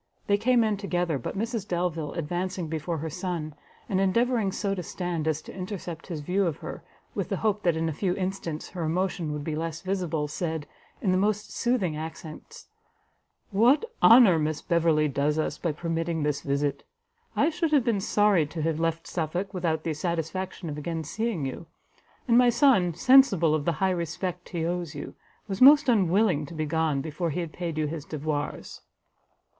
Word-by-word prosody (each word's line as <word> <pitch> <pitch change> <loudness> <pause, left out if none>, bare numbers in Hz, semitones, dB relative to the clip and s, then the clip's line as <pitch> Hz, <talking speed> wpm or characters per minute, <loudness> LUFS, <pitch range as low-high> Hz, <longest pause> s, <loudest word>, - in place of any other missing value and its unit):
They 200 - +3
came 245 +1 +4
in 215 -2 +1
together, 175 -6 -1
but 125 - -5
Mrs 225 -1 -2
Delvile, 170 -4 -2
advancing 175 +2 -3
before 160 +1 -3
her 160 +2 -4
son, 175 -3 -4 0.3
and 190 -1 +1
endeavouring 225 +1 +2
so 200 +1 -1
to 190 - -3
stand 175 -2 -3
as 155 -1 0
to - - -10
intercept 180 -3 -6
his 165 -5 -5
view 185 +5 +1
of 160 - -2
her, - - -8 0.3
with - - -3
the - - -1
hope 210 -1 +2
that 170 -4 +2
in 165 0 0
a 160 - -1
few 180 +4 -1
instants 185 -5 -4
her 180 -2 -5
emotion 175 0 -1
would 150 -1 -4
be 155 0 -3
less 165 0 -4
visible, 180 -6 -1
said, 160 0 -3 0.4
in 190 - +2
the 185 - +3
most 210 +1 0
soothing 230 -10 0
accents, 160 - -8 0.9
"What 240 - +4 0.2
honour 225 -8 +8
Miss 155 0 -1
Beverley 165 -3 +2
does 145 +2 0
us 155 - -1
by 170 - 0
permitting 165 +1 -2
this 145 -1 0
visit! 140 0 -1 0.5
I 320 - +3
should 330 -1 -1
have 290 -5 +4
been 225 -5 +1
sorry 200 -6 +3
to 160 +1 -5
have 160 -1 0
left 165 0 -1
Suffolk 180 +4 -3
without 165 -4 -1
the 160 - -1
satisfaction 170 +3 -3
of 150 -1 -4
again 165 +1 -3
seeing 205 -1 -2
you; 135 +5 -6 0.6
and 240 0 +6
my 250 -1 +6
son, 230 - +4
sensible 195 - +5
of 155 -2 0
the 170 - +2
high 190 +4 +1
respect 175 +1 -3
he 165 -2 -2
owes 175 -2 -3
you, 145 - -7 0.3
was 195 +2 -4
most 285 +2 +8
unwilling 190 - +3
to 165 - -9
be 155 0 -1
gone, 155 -2 0
before 160 +4 -3
he 160 +4 -2
had 165 -2 -6
paid 170 -3 -4
you 155 - +1
his 150 0 -4
devoirs." 150 -1 -4
170 Hz, 190 wpm, -27 LUFS, 155-195 Hz, 0.9 s, honour